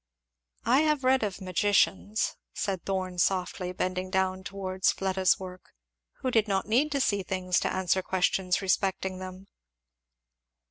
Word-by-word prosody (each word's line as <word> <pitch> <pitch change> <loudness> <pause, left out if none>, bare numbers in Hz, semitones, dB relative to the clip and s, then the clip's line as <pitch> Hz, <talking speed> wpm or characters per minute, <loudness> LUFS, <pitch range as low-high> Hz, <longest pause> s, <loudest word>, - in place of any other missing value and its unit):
"I 245 +4 +5
have 300 -3 +2
read 260 +1 +4
of 205 -4 -3
magicians," 200 +2 +1 0.2
said 195 -3 -2
Thorn 185 -2 -2
softly, 180 0 0
bending 185 0 -2
down 190 0 0
towards 190 -1 0
Fleda's 190 -1 +1
work, 185 - -10 0.5
"who 255 - -1
did 225 -3 +3
not 195 -1 0
need 260 +8 +2
to 280 - +1
see 205 -6 +1
things 185 -1 0
to - - -1
answer 190 0 +1
questions 185 0 0
respecting 190 -1 0
them." 185 +1 -8
190 Hz, 140 wpm, -28 LUFS, 185-205 Hz, 0.5 s, I